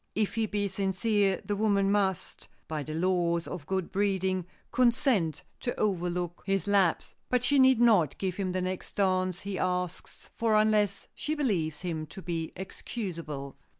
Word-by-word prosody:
If 215 -1 0
he 225 -1 0
be 205 -1 -1
sincere 195 +1 +1
the 205 - -1
woman 200 -2 +2
must, 195 -3 -1 0.2
by 155 -1 -3
the 155 +2 -5
laws 170 -1 +1
of 165 -5 -7
good 190 -2 -2
breeding, 190 -2 0 0.2
consent 235 - +2 0.2
to 245 - -3
overlook 175 -3 -1
his 195 -1 0
lapse, 200 -4 +2 0.2
but 250 -1 +2
she 280 +3 +4
need 260 -2 +6
not 210 - +4
give 185 -2 -2
him 190 -2 -1
the 185 0 -1
next 185 0 -4
dance 185 -2 +1
he 200 -1 -4
asks 180 -1 -3
for 225 -2 +1
unless 215 -2 +2
she 310 - -3
believes 175 - 0
him 160 -3 -3
to 190 - -9
be 165 -2 -3
excusable. 165 - -6
190 Hz, 160 wpm, -29 LUFS, 175-210 Hz, 0.2 s, need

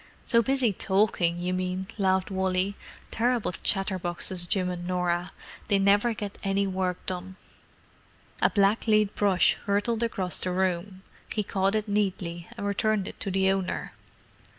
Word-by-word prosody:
"So 230 -1 +4
busy 255 -3 +2
talking, 190 -3 +1
you 180 +1 -2
mean," 185 +1 -2
laughed 190 -1 +1
Wally. 190 +1 0 0.4
"Terrible 240 -3 +1
chatterboxes, 180 -1 0
Jim 190 -3 +1
and 175 -1 -4
Norah; 180 -1 -1 0.4
they 200 - +3
never 205 +4 +3
get 205 -1 -6
any 195 0 +1
work 185 -2 -2
done." 185 0 -5 1.1
A - - +5
blacklead 215 0 +2
brush 195 -3 +3
hurtled 205 +3 0
across 190 -6 -1
the 185 - -1
room: 185 +1 -1 0.3
he 210 - 0
caught 195 +1 0
it 215 0 -1
neatly 190 -4 -2
and 205 - -4
returned 205 0 0
it - - -8
to 200 - -2
the 190 0 +2
owner. 195 -1 -2
190 Hz, 145 wpm, -27 LUFS, 185-205 Hz, 1.1 s, A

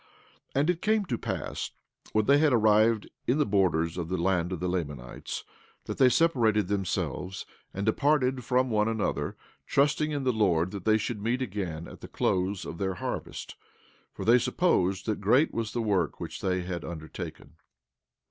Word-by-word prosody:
17:13 - - +3
And 150 - +1
it 175 - -6
came 215 0 +2
to 120 -9 -2
pass - - -4 0.4
when 110 -1 +2
they 140 +4 +5
had 155 -1 +4
arrived 110 -1 +4 0.2
in 125 - +3
the 150 - +3
borders 90 -4 +1
of 85 -1 -4
the 95 - -1
land 90 0 +1
of 90 - -3
the 90 - -1
Lamanites, 75 -9 -4 0.4
that - - -5
they 130 - +7
separated 120 - +3
themselves 95 -1 -2 0.3
and 100 +1 -3
departed 135 +2 +2
one - - -6
from 125 +1 +1
another, 110 -2 -1 0.3
trusting 145 +2 +2
in 145 -2 -2
the 130 -1 +2
Lord 95 -5 +2
that 100 -3 -7
they 110 0 +5
should 110 0 -3
meet 120 +4 0
again 90 -7 -4
at - - -12
the - - -8
close 95 +1 0
of 85 - -7
their 95 -1 -1
harvest; - - -5 0.6
for - - -7
they 120 +2 +6
supposed 95 - +1
that 110 -2 -2
great 125 +10 +3
was 115 -2 -2
the 120 -1 -2
work 95 -7 0
which - - -6
they 90 -1 0
had 90 -1 -4
undertaken. 80 -2 -8
105 Hz, 180 wpm, -28 LUFS, 90-125 Hz, 0.6 s, they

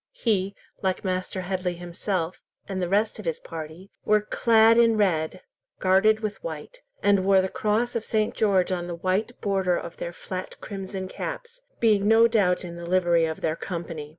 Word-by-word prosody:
He, 200 - 0 0.3
like 190 -1 -1
Master 185 0 -2
Headley 180 -1 -2
himself, 175 0 -3 0.3
and 190 -2 -3
the 175 - -1
rest 210 +3 +1
of 210 - -8
his 165 -2 -1
party 165 +4 -9
were 215 0 +4
clad 225 +1 +4
in 230 -2 +4
red, 180 -4 0 0.3
guarded 195 +4 +3
with 215 - -4
white, - - -7 0.2
and 200 -2 +4
wore 195 0 +5
the 190 - +1
cross 220 +5 0
of 230 - -1
St. 215 -1 0
George 195 -4 +2
on 175 -1 -2
the 175 - -4
white 190 +7 -1
border 190 -3 +1
of 170 - -7
their 170 - -4
flat 185 +2 -7
crimson 190 -1 -6
caps, - - -6 0.2
being 210 -3 +3
no 225 +1 +6
doubt 195 -6 +2
in 170 -1 -8
the 170 - -7
livery 175 -2 +3
of 160 0 -4
their 160 0 0
Company. 165 -4 -6
190 Hz, 180 wpm, -25 LUFS, 175-215 Hz, 0.3 s, no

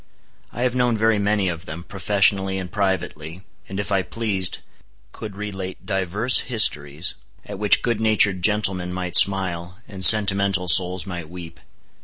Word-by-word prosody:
I 120 - -5
have 125 -1 -1
known 125 -2 0
very 110 -1 +1
many 100 -1 0
of 85 -1 -6
them, 80 +3 -8
professionally 100 0 -1
and 90 -2 -7
privately, 95 -4 -4 0.3
and 95 +1 -6
if 100 0 -5
I 100 -1 +1
pleased, 95 -1 -3 0.5
could 105 -3 -9
relate 95 -2 -8
divers 100 +5 +2
histories, 75 - +1 0.3
at - - -9
which 105 -1 +3
good 115 -2 -2
natured 105 -4 +1
gentlemen 95 -3 -1
might 90 -1 -5
smile, 90 -1 +3
and 95 -2 -8
sentimental 100 -2 +5
souls 90 +1 +3
might 85 -5 -8
weep. 85 -2 -11
95 Hz, 150 wpm, -21 LUFS, 90-105 Hz, 0.5 s, sentimental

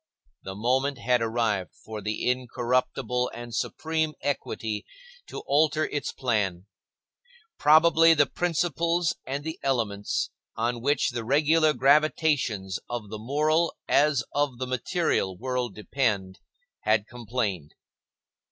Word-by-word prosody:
The 95 - -7
moment 130 +6 +1
had 120 +1 +1
arrived 110 -4 -1
for 110 -1 -6
the 105 +3 -3
incorruptible 125 0 0
and 120 0 -8
supreme 160 +5 -1
equity 110 -6 -2 0.4
to - - -7
alter 155 +2 +2
its 145 -3 -3
plan. 100 -8 -1 0.9
Probably 165 +2 +6
the 145 -1 +5
principles 170 0 0
and 140 +2 -3
the 160 +1 -5
elements, 110 -7 -1 0.2
on 120 +1 -1
which 140 +2 +1
the 120 - -4
regular 155 +5 +3
gravitations 135 - +2
of 115 -4 -5
the 110 - -5
moral, 155 +7 +1
as 145 -3 +3
of 145 -3 0
the 130 - -3
material, 130 - -1
world 125 -2 -3
depend, 105 -5 -1 0.4
had 110 -1 +2
complained. 115 - -3
125 Hz, 115 wpm, -26 LUFS, 110-150 Hz, 0.9 s, Probably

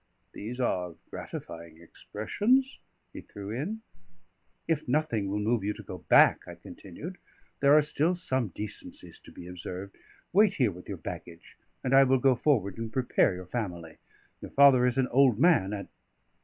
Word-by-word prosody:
"These 120 +5 -7
are 90 -8 -1 0.2
gratifying 85 -1 -8
expressions," 210 - -1 0.3
he - - -8
threw 100 0 -9
in. 185 - -4 0.8
"If 160 -2 -1
nothing 125 -7 0
will 100 - -2
move 110 +1 0
you 105 +1 -1
to 110 - -10
go 90 -1 -8
back," - - +4
I - - -8
continued, 155 - -10 0.4
"there 140 +2 +6
are 155 - +5
still 155 +4 +1
some 130 -9 -1
decencies 105 +3 -8
to - - -16
be 85 - -11
observed. 90 +2 -8 0.4
Wait 205 +1 +4
here 125 -6 +2
with 90 0 -12
your - - -4
baggage, 85 -1 -9 0.3
and 130 - -1
I 135 0 +8
will 130 0 +3
go 130 +1 +4
forward 115 -6 0
and 115 -1 -5
prepare 120 -5 +1
your 90 0 -8
family. 90 -6 -5 0.4
Your - - -8
father 135 -3 +6
is 125 +1 -1
an 130 -1 +2
old 130 -3 +4
man; 140 - +3
and 100 -1 -5
120 Hz, 170 wpm, -28 LUFS, 95-140 Hz, 0.8 s, I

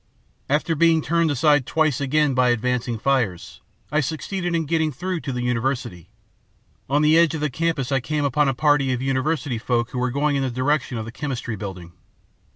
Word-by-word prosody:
"After 150 +4 +1
being 165 0 +3
turned 170 0 +1
aside 145 -1 +3
twice 155 -4 +1
again 145 +1 +2
by 125 -1 +3
advancing 120 0 0
fires, 110 -8 -1 0.3
I 150 - +2
succeeded 170 +4 -2
in 165 -1 0
getting 160 0 0
through 180 +6 -3
to 140 - -5
the 125 -1 -3
university. 125 - -2 0.8
On 145 +2 +2
the 155 +2 +5
edge 170 -1 +3
of 155 - -4
the 150 -2 -1
campus 160 -3 -1
I 135 - +2
came 150 +3 -2
upon 140 +1 +2
a 135 - -1
party 145 -2 +2
of 125 - -3
university 135 -1 -1
folk 120 0 -1
who 125 - -3
were 125 +1 0
going 145 +3 0
in 140 - 0
the 135 - 0
direction 130 +1 -1
of 110 - -4
the 115 - -7
Chemistry 125 -3 -4
Building. 95 -4 -7
140 Hz, 195 wpm, -22 LUFS, 125-155 Hz, 0.8 s, the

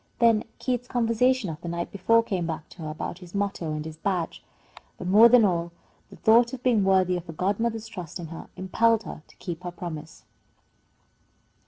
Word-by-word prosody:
Then 230 -2 +4
Keith's 245 -1 -2
conversation 245 0 +2
of 155 +1 -9
the 170 - -7
night 170 0 -3
before 230 +4 +3
came 185 -6 -2
back 160 -2 -5
to 175 - -13
her 155 - -4
about 155 +3 -5
his 180 0 -12
motto 200 -5 -2
and 150 0 -4
his 160 -1 -8
badge. 180 -1 -2 0.5
But - - -7
more 210 +6 +7
than 240 -2 +7
all, 170 -2 0 0.4
the - - -12
thought 235 +3 +4
of 250 -1 -7
being 235 -5 +3
worthy 185 -1 +3
of 175 - -8
her 165 - -7
godmother's 220 +6 -1
trust 180 -8 -7
in 165 -2 -7
her 165 - -9
impelled 225 +4 +2
her - - -8
to - - -20
keep 175 -2 -6
her 180 - -5
promise. 165 -2 -8
190 Hz, 195 wpm, -26 LUFS, 170-230 Hz, 0.5 s, more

